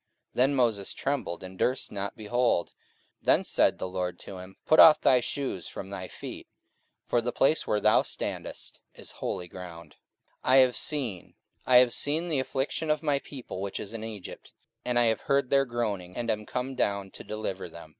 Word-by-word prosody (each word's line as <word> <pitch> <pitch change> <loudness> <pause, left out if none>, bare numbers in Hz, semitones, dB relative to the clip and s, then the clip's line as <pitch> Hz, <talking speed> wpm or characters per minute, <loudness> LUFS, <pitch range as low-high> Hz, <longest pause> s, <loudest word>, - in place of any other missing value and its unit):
Then 135 +3 +3
Moses 115 -6 +1
trembled, 135 -12 -2
and 95 0 -10
durst 130 +1 0
not 100 +1 -4
behold. 115 -3 0 0.5
44:007:033 - - -28
Then - - +5
said - - +2
the - - -3
Lord 90 -1 -3
to 95 - -8
him, 95 +1 -11
Put 155 - +4
off 155 - +10
thy 130 - +5
shoes 130 -7 -3
from 95 0 -7
thy 95 -2 -5
feet: - - -9 0.6
for 120 - +1
the 120 +1 -2
place 150 +6 +2
where 105 - +2
thou 110 +1 +5
standest - - -6
is - - -9
holy 90 - -4
ground. 85 -3 -10 0.5
44:007:034 - - +1
I - - +7
have 130 -2 +6
seen, 125 - -3 0.3
I 130 - +5
have 125 -1 +7
seen 160 +4 -1
the 150 -4 +1
affliction 135 +4 -2
of 150 +1 +1
my 145 -2 +2
people 130 -9 -8
which 100 -1 -4
is 105 +1 -7
in 110 -1 -5
Egypt, 110 -4 -8 0.3
and 125 -1 0
I 120 - +5
have 115 -1 +2
heard 140 -2 +1
their 135 0 +4
groaning, 105 -7 -3
and 120 -1 0
am 105 0 -4
come 125 +2 -3
down 100 -5 -1
to - - -10
deliver 100 -4 -5
them. 85 -1 -11
115 Hz, 195 wpm, -28 LUFS, 95-130 Hz, 0.6 s, off